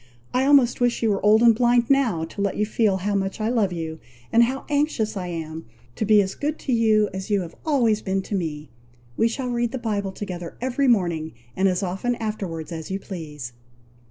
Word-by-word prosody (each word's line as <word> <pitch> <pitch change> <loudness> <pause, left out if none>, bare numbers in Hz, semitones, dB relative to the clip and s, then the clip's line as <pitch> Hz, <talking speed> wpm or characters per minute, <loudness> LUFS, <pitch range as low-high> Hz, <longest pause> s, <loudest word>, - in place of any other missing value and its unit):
I 255 +1 +2
almost 270 -4 +4
wish 245 -1 +1
you 220 - +3
were 195 - -1
old 215 +2 +5
and 235 -1 +7
blind 240 +1 +3
now, 250 -12 +2
to 200 - -7
let 200 -1 -1
you 210 - +2
feel 210 -2 +1
how 200 +2 -2
much 195 +1 -1
I 215 +1 0
love 220 -6 +1
you, 160 -2 -5 0.3
and 230 - +6
how 265 +3 -4
anxious 285 -7 0
I 185 -2 -4
am 160 -2 -6 0.3
to 215 - -1
be 210 -1 +5
as 190 0 -4
good 300 +2 -2
to 265 - -1
you 220 -2 +3
as 190 +1 -5
you 205 -2 +2
have 170 -2 -7
always 235 -8 +2
been 190 0 -1
to - - -7
me. 155 -7 -3 0.4
We 225 - +3
shall 250 +2 -3
read 240 -1 0
the 260 - -3
Bible 205 -5 -2
together 180 -4 -7
every 260 +2 0
morning, 170 -9 +1 0.2
and 190 +1 +2
as 185 +1 -1
often 195 +7 -1
afterwards 195 -8 -4
as 160 -2 -6
you 190 - -1
please." 150 - -7
210 Hz, 215 wpm, -23 LUFS, 180-240 Hz, 0.4 s, and